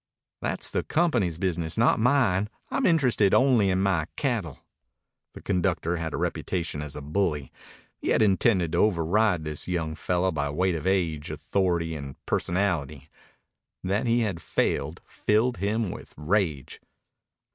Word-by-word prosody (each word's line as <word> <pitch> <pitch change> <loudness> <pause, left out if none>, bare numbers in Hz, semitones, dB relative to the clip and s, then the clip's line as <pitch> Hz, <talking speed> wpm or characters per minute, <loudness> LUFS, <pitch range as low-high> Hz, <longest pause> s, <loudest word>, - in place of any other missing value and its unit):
"That's - - -2
the - - 0
company's 120 - +1
business, 85 -2 -2
not 115 0 +4
mine. 110 -5 +2 0.2
I'm - - +1
interested 125 - +3
only 125 -7 +4
in 95 0 +1
my 90 -5 +1
cattle." 110 - -2 0.8
The - - -11
conductor 90 -2 0
had 80 -1 -3
a - - -3
reputation 85 -5 -2
as 75 -1 -7
a 75 - -7
bully. 75 -2 -1 0.5
He - - -6
had - - +4
intended 95 -4 +2
to 85 - 0
override 90 -1 +2
this 75 -1 -5
young 85 -3 -2
fellow 90 +4 0
by 75 -3 -2
weight 90 +5 +1
of 80 +2 -3
age, 85 -6 0
authority, 85 -4 -1
and 70 -3 -7
personality. 80 -6 -1 0.7
That 100 +5 0
he 120 +1 +3
had 95 -7 -2
failed - - -1
filled 110 +3 +1
him 105 +1 -1
with - - -10
rage. 75 - -1
90 Hz, 145 wpm, -26 LUFS, 80-105 Hz, 0.8 s, not